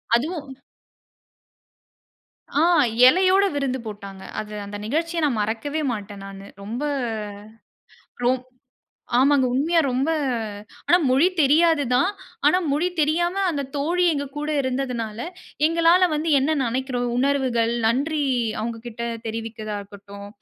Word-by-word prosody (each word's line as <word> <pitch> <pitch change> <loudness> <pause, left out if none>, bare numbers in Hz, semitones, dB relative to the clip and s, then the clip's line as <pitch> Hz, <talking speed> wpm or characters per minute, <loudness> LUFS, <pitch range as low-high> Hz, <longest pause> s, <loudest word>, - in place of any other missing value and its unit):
அதுவும் 295 +2 -2 2.1
ஆ, - - +4 0.5
இலையோட 375 +6 +5
விருந்து 265 -2 -1
போட்டாங்க. 200 -2 -8 0.2
அது 210 0 -6
அந்த 205 +1 -7
நிகழ்ச்சிய 330 +7 -1
நான் 245 -7 0
மறக்கவே 260 +9 -2
மாட்டேன் 205 -2 -7
நானு. 195 0 -10 0.2
ரொம்ப, 235 +7 -4 1.4
ரொம் 250 +1 +2 0.8
ஆமாங்க. 275 -1 +4
உண்மையா 325 +5 +2
ரொம்ப, 265 +6 0 0.8
ஆனா, 350 - +6
மொழி 275 +7 +4
தெரியாது 305 +1 +4
தான். 310 +10 +3 0.4
ஆனா 360 +5 +5
மொழி 325 +5 +1
தெரியாம 345 +4 +1 0.2
அந்த 285 -4 -2
தோழி 345 +5 +1
எங்ககூட 295 +1 -4
இருந்ததனால 250 -4 -3 0.5
எங்களால 335 +2 +4
வந்து 310 +2 -1
என்ன 300 +3 +1
நெனைக்கிறோம், 250 0 -2
உணர்வுகள், 255 -4 +1
நன்றி 290 +6 +1 0.4
அவங்கக்கிட்ட 230 +1 -5 0.2
தெரிவிக்கிறதா 220 -1 -5
இருக்கட்டும், 200 0 -11
265 Hz, 110 wpm, -23 LUFS, 225-315 Hz, 2.1 s, ஆனா